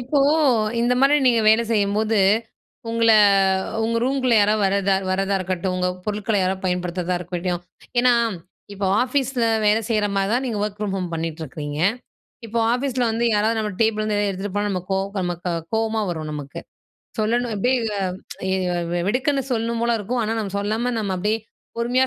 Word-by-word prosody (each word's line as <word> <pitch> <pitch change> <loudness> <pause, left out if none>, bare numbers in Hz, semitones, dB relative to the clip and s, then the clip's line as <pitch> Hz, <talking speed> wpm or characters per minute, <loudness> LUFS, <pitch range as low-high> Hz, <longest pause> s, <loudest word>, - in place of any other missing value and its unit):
இப்போ 265 +4 0 0.6
இந்த 240 +1 +2
மாரி 275 +2 +5
நீங்க 235 -2 +4
வேலை 220 +2 +5
செய்யும்போது, 215 0 +1 0.7
உங்கள 230 0 +3 0.7
உங்க 230 +1 0
ரூம்குள்ள 255 -2 +1
யாராவது 210 0 +3
வரதா 195 0 +2 0.2
வரதா 195 +1 0
இருக்கட்டும், 185 0 -2
உங்க 180 0 0 0.2
பொருட்கள 210 0 -1
யாராவது 190 +1 -1
பயன்படுத்துறதா 180 0 -1
இருக்கட்டும். 175 0 -3 0.4
ஏனா, 250 0 +5 0.6
இப்போ 195 -1 -2 0.2
ஆஃபீஸ்ல 255 -1 0 0.2
வேலை 210 +2 +4
செய்ற 215 -2 +2
மாரி 195 0 +1
தான, 250 - +1
நீங்க 225 -4 -2
ஒர்க் 210 0 -5
பிரம் 205 -2 -2
ஹோம் 180 -2 -3
பண்ணிட்டிருக்கீங்க. 155 -2 -5 0.7
இப்போ 230 +1 -2 0.2
ஆஃபீஸ்ல 255 0 -1
வந்து 225 +2 -1
யாராவது 220 +2 +1
நம்ம 210 -1 -2
டேபிள்ல 220 -1 +2
இருந்து 215 -1 -1
எதாவது 205 -1 +1
எடுத்துட்டு 195 +1 -5
போனா 205 0 0
நமக்கு 185 0 -2 0.3
நமக்கு 175 0 -3 0.2
கோவமா 220 0 0
வரும் 155 -2 -4
நமக்கு. 145 -2 -6 0.6
சொல்லணும், 235 +2 0
அப்படியே 250 +6 +2 1.3
வெடுக்குன்னு 270 +5 +1
சொல்லணும் 230 0 -1
போல 235 0 +2
இருக்கும். 235 +4 -2
ஆனா, 220 +1 -1
நம்ம 200 -3 -4
சொல்லாம 220 +5 -1
நம்ம 200 -3 -1
அப்படியே 210 +4 0 0.4
பொறுமையா 245 +3 +2
210 Hz, 155 wpm, -22 LUFS, 190-235 Hz, 1.3 s, மாரி